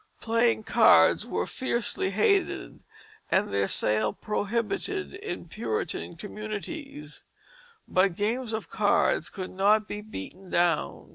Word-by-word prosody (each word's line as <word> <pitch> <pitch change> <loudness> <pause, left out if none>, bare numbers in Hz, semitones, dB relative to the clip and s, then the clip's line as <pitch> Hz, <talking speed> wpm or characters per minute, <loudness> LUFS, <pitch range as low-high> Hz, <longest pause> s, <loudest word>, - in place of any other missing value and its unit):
Playing 230 -1 +2
cards - - +5
were - - -1
fiercely 235 -6 -1
hated, 290 - +1 0.5
and 195 +2 +2
their 100 0 +1
sale 110 +2 +1
prohibited 230 - -2
in 410 +3 -6
Puritan 435 - -3
communities, 215 - -7 0.7
but 185 -1 +2
games 225 +4 -1
of 220 0 -3
cards - - +2
could 185 -2 -6
not 210 +3 +3
be 210 - -5
"beaten 190 - -9
down." 170 -3 0
210 Hz, 115 wpm, -27 LUFS, 185-235 Hz, 0.7 s, cards